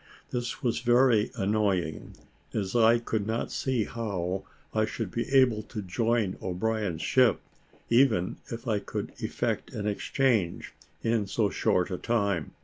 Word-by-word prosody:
This 120 -1 -3
was 120 -2 +1
very 120 -2 +4
annoying, 95 -5 -1 0.4
as 95 -1 -2
I 115 0 +6
could 110 -3 -2
not 110 +1 -2
see 130 -4 0
how 95 -5 -3 0.3
I 110 - +2
should 110 -2 -3
be 120 - -2
able 130 -5 +4
to 105 0 -7
join 110 +1 0
O'Brien's 95 -2 -2
ship, 130 -4 +4 0.5
even 115 -7 +3
if 115 +2 -6
I 110 -3 +1
could - - -5
effect - - -2
an 105 - -4
exchange, 105 -2 0 0.3
in 115 -3 +1
so 100 0 +1
short 90 +1 +1
a 90 - -3
time. 100 -9 0
110 Hz, 140 wpm, -28 LUFS, 95-120 Hz, 0.5 s, I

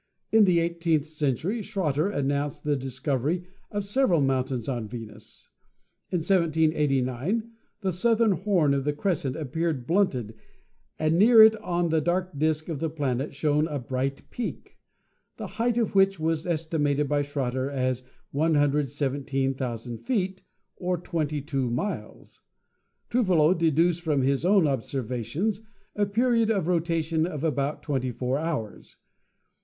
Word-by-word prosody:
In 220 -1 +6
the 180 -3 +4
eighteenth 165 -3 0
century 155 - -1
Schroter 170 -4 -1
announced 145 -4 -2
the 150 -1 +1
discovery 135 +5 -2 0.3
of 205 -1 -3
several 205 - +2
mountains 130 -3 0
on 120 -5 -2
Venus. 110 -1 -10 0.6
In 180 - 0
1789 160 - +1 0.3
the 190 -2 0
southern 225 +4 +3
horn 180 -5 +2
of 140 -1 0
the 150 +1 0
crescent 145 -4 -1
appeared 155 -2 -2
blunted 130 - +1 0.6
and 155 +2 +1
near 225 +1 +8
it 220 0 +7
on 175 -5 -1
the 160 -1 +2
dark 180 +1 -1
disc 155 +1 0
of 160 -5 -4
the 160 - -1
planet 140 -3 -2
shone 150 +1 +1
a 150 -3 -3
bright 130 +2 -3
peak, 245 - -6 0.6
the - - -5 0.2
height 240 0 +1
of 230 -4 0
which 195 -2 +4
was 160 +1 -1
estimated 150 -3 0
by 145 +1 +1
Schroter 135 -2 -2
as 130 -2 -1 0.3
117,000 140 -5 0
feet, 190 -7 -2 0.4
or 180 -1 -1
22 150 -6 -2
miles. 130 - -5 0.7
Trouvelot 185 -8 +3
deduced 165 +1 +2
from 150 -5 +1
his 135 +4 +1
own 190 -2 +5
obser 135 -1 -1
vations 130 - -2 0.4
a 205 -1 +1
period 230 +1 +2
of 195 -7 +1
rotation 165 -2 0
of 150 -4 -5
about 145 -2 -1
24 130 -1 -1
hours. 150 -10 -4
155 Hz, 135 wpm, -26 LUFS, 135-180 Hz, 0.7 s, near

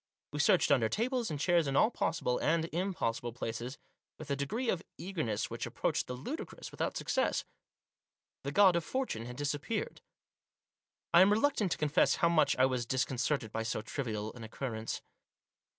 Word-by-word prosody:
We 145 - -4
searched 150 - +4
under 120 -6 +4
tables 245 +1 0
and 150 -2 -3
chairs 170 -1 +3
in 135 - -1
all 220 - +5
possible 125 - 0
and 165 +1 +2
impossible 160 - -1
places, 120 +2 -4 0.4
with 155 -2 -7
a - - +2
degree 215 - -2
of 180 -6 +1 0.2
eagerness 125 - -2
which 115 - -3
approached - - -1
the 125 - -4
ludicrous, 250 - -6
without - - -2
success. - - 0 1.0
The - - -3
God 195 -3 +6
of 170 - +1
Fortune 205 - -2
had 125 - -7
disappeared. 145 - -3 1.1
I 170 - +9
am 190 +2 +6
reluctant 220 -3 +2
to - - -6
confess 150 -1 +3
how 170 - +3
much 155 -3 +4
I 130 - +5
was 125 -3 -1
dis 130 0 +1
concerted 125 -2 -1
by 115 - -2
so 110 -1 -2
trivial 110 -4 -3
an 120 - -10
occurrence. 110 -1 -4
140 Hz, 170 wpm, -32 LUFS, 120-180 Hz, 1.1 s, I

